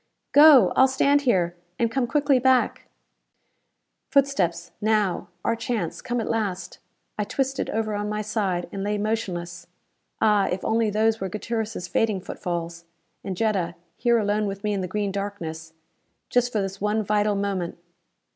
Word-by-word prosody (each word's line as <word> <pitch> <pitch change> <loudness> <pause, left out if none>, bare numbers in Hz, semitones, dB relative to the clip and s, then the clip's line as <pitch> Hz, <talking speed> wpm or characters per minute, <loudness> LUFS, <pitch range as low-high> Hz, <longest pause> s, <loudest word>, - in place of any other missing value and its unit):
Go! 290 - +8
I'll 265 - +6
stand 280 +2 +3
here, 175 -5 +2 0.2
and 230 -1 +1
come 255 0 0
quickly 285 0 +2
back." 260 0 +2 1.2
Footsteps. 200 -12 +1
Now! 210 -4 +1 0.2
Our 230 - +2
chance, 215 -8 -3
come 245 -1 -2
at 225 - -3
last! 190 -5 -3 0.4
I - - +2
twisted 270 +5 -2
over 215 -1 -1
on 205 0 -2
my 210 0 -2
side, 195 -5 -1
and 195 - -5
lay 210 +1 -1
motionless. 185 -5 -3 0.5
Ah, 210 -2 +3
if 185 - -3
only 225 0 +2
those 220 +1 +1
were 190 - -2
Gutierrez' 215 -2 -4
fading 210 +2 +1
footfalls! 170 -2 -5 0.4
And 190 -2 -4
Jetta, 190 -6 0 0.2
here 235 -1 +2
alone 210 -1 0
with 195 +1 -5
me 210 0 0
in 195 - -1
the 180 - -3
green 205 +1 -2
darkness! 165 -5 -5 0.6
Just 245 0 +2
for 210 -4 0
this 195 0 -6
one 210 +1 +1
vital 210 0 +1
moment. 195 -4 -2
210 Hz, 155 wpm, -24 LUFS, 185-225 Hz, 1.2 s, Go